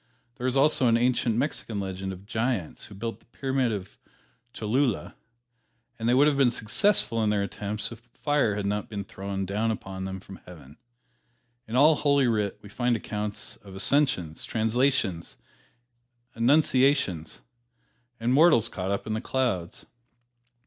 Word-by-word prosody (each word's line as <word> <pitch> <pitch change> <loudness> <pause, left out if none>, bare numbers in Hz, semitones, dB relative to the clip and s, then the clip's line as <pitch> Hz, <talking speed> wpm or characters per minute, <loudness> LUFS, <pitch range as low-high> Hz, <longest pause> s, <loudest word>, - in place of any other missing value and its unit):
There 125 0 -2
is 130 +1 +1
also 135 -2 +4
an 115 0 +4
ancient 120 -1 +1
Mexican 120 -5 -2
legend 95 0 -4
of 95 +1 -10
giants 110 -5 -2
who 105 - -12
built 115 +3 -5
the - - -29
Pyramid 130 0 -1
of 95 -3 -6 0.5
Cholula, 120 +2 -1 0.9
and 115 +1 0
they 125 - +4
would 140 +3 +6
have 150 -2 +2
been 135 -3 +5
successful 115 - +1
in 105 - +2
their 105 -1 +1
attempts 105 +2 -4
if 115 - -9 0.2
fire 145 -8 +1
had 105 -1 -3
not 105 +1 -2
been 100 -2 -4
thrown 95 0 -5
down 105 +4 -1
upon 95 -3 -4
them 95 0 -5
from 95 0 -11
Heaven. 75 -5 -13 0.9
In 110 - -4
all 150 +5 +7
"Holy 140 -2 +3
Writ" 105 -4 0
we - - -10
find 120 +3 0
accounts 105 -1 -4
of 95 -2 -13
"ascensions," 95 - +1
"translations," 110 -5 0 1.0
"annunciations," 130 - +2 0.8
and 120 +2 +1
mortals 140 -7 +5
caught 95 -3 -4
up 100 0 -2
into 110 0 -2
the - - -8
clouds. 120 -11 -2
110 Hz, 155 wpm, -27 LUFS, 100-130 Hz, 1.0 s, all